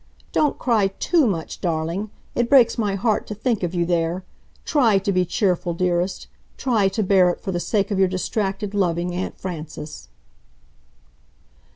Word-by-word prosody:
"Don't 300 -2 +1
cry 225 -6 +2
TOO 285 - +1
much, 165 -6 -3
darling... 170 +4 -2 0.2
it 240 -1 0
breaks 250 -5 +6
my 210 -4 0
heart 215 +2 0
to 210 - -5
think 225 0 -1
of 175 0 -2
you 170 -1 +1
there! 170 +1 0 0.4
TRY 240 -10 +3
to 195 +1 0
be 185 -1 +2
cheerful, 180 -1 0
dearest! 180 +1 0 0.3
TRY 225 -7 +2
to 195 +3 -1
bear 185 -2 +4
it 175 - -2
for 190 - -4
the 175 - -1
sake 200 +4 0
of 195 - 0
your 190 - +5
distracted, 195 +2 -2
loving 175 -3 0
Aunt 180 +1 -4
Frances." 155 -3 -7
190 Hz, 165 wpm, -22 LUFS, 175-215 Hz, 0.4 s, breaks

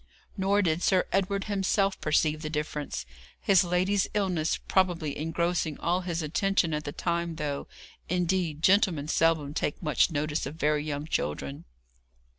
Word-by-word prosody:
Nor 200 +1 +2
did 165 -1 +1
Sir 185 -1 +3
Edward 195 +1 0
himself 195 -1 0
perceive 155 0 +1
the 155 - -4
difference, 150 - -3 0.3
his 195 -2 +4
lady's 185 +3 +1
illness 180 -6 +1
probably 175 -6 0
engrossing 165 0 -1
all 175 +2 +1
his 170 -2 -3
attention 175 +1 +1
at 150 0 -2
the 145 - -3
time, 170 +1 -2
though, 145 -3 -3 0.4
indeed, 175 -3 0
gentlemen 185 -7 +3
seldom 160 -3 +2
take 150 - -2
much 150 +3 +3
notice 150 -2 -1
of 145 - -7
very 150 -1 +1
young 145 -1 -3
children. 70 - -3
165 Hz, 145 wpm, -28 LUFS, 150-185 Hz, 0.4 s, his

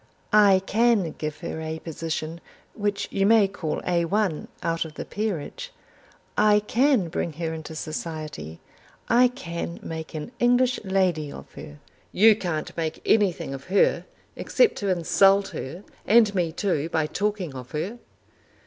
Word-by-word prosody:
I 200 -3 +6
can 220 -6 +2
give 155 -1 -4
her 160 - -5
a 160 0 -4
position 165 0 -5 0.3
which 205 -1 -2
you 195 0 +2
may 220 -2 +6
call 185 -6 -4
Al 175 0 0 0.2
out 165 0 0
of 160 -2 -10
the - - -6
Peerage. 215 - -4 0.6
I 210 0 +5
can 240 -1 +2
bring 165 0 -3
her 160 +1 -3
into 160 0 -7
society. 155 - -6 0.5
I 245 +2 +6
can 170 -9 -6
make 160 0 -6
an 155 +9 -5
English 245 +1 +3
lady 185 -6 0
of - - -11
her." 75 - -10 0.3
"You 215 +2 +6
can't 170 -7 -4
make 160 -2 -3
anything 180 -9 +2
of 135 0 -8
her, 195 +2 +2 0.3
except 485 -3 +2
to 200 - -2
insult 195 +3 +4
her, 170 +9 -7 0.2
and 220 -1 +5
me 175 -4 0
too 165 -3 -1
by 160 -2 +1
talking 200 -2 -2
of 125 -2 -8
her." 190 +10 -4
180 Hz, 150 wpm, -25 LUFS, 160-210 Hz, 0.6 s, I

